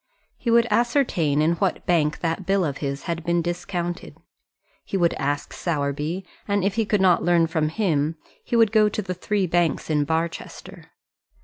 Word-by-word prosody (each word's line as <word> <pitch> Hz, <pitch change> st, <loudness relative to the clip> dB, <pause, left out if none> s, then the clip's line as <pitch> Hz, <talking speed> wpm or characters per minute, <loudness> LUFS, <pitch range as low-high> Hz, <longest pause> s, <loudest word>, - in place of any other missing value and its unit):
He 235 Hz, -, -4 dB
would 230 Hz, 0 st, +5 dB
ascertain 210 Hz, -, +2 dB
in 170 Hz, +2 st, +2 dB
what 190 Hz, 0 st, -1 dB
bank 155 Hz, -4 st, +1 dB
that 165 Hz, +3 st, -1 dB
bill 195 Hz, 0 st, +1 dB
of 140 Hz, -3 st, -3 dB
his 140 Hz, -1 st, -4 dB
had 170 Hz, -1 st, -3 dB
been 170 Hz, 0 st, +1 dB
discounted. 175 Hz, 0 st, -4 dB, 0.7 s
He 195 Hz, -, -3 dB
would 170 Hz, -2 st, +2 dB
ask 145 Hz, +1 st, -2 dB
Sowerby, 150 Hz, +3 st, -2 dB, 0.2 s
and 200 Hz, -2 st, +1 dB
if 195 Hz, 0 st, +1 dB
he 225 Hz, 0 st, 0 dB
could 210 Hz, -2 st, +1 dB
not 185 Hz, -2 st, +4 dB
learn 175 Hz, -1 st, +3 dB
from 160 Hz, -1 st, 0 dB
him, 160 Hz, -4 st, 0 dB, 0.3 s
he 240 Hz, -, -2 dB
would 225 Hz, -3 st, +5 dB
go 215 Hz, -1 st, +4 dB
to 215 Hz, -, -3 dB
the 185 Hz, -1 st, -3 dB
three 195 Hz, +2 st, -1 dB
banks 170 Hz, -2 st, 0 dB
in 150 Hz, -1 st, +2 dB
Barchester. 160 Hz, +3 st, -4 dB
175 Hz, 180 wpm, -23 LUFS, 160-200 Hz, 0.7 s, would